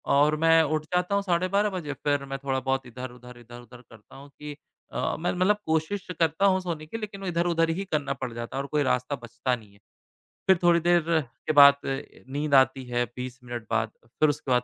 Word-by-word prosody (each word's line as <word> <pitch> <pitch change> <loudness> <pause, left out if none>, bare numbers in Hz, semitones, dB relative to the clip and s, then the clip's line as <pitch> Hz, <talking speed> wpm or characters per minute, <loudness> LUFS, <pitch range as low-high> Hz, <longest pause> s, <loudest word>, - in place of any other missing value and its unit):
और 150 +2 +4
मैं 165 0 +5
उठ 155 0 -1
जाता 180 +3 +1
हूँ 200 - +1
साढ़े 180 -1 +1
12 200 +3 +2
बजे। 170 -7 -4
फ़िर 145 0 -1
मैं 135 0 -4
थोड़ा-बहुत 135 0 -1
इधर-उधर, 125 0 -9
इधर-उधर 120 +1 -13
करता 115 -3 -18
हूँ 140 +1 -12
कि 150 -1 -7 0.4
अ, - - -1
मैं 175 +2 0
मतलब 185 +3 +2
कोशिश 160 +5 -1
करता 165 +3 +2
हूँ 190 -1 +4
सोने 165 -4 -4
की, 160 - -6
लेकिन 210 -3 -7
इधर-उधर 170 -2 +1
ही 180 +5 -1
करना 145 -3 0
पड़ 130 -3 -5
जाता 120 +2 -6
है 135 - 0
और - - -7
कोई 150 -1 +1
रास्ता 125 +2 0
बचता 120 +1 -3
नहीं 105 -4 -15
है। 100 - -21 0.7
फ़िर 190 -1 +6
थोड़ी 170 -1 +5
देर 175 +1 +3 0.5
के 155 - +2
बाद 140 -1 +9
नींद 140 +1 -4
आती 130 0 +4
है 120 0 0
20 125 0 -6
मिनट 120 -2 -6
बाद। 110 - 0
फ़िर 150 +6 +1
उसके 140 -2 -3
बाद 125 -1 +3
145 Hz, 210 wpm, -26 LUFS, 125-170 Hz, 0.7 s, बाद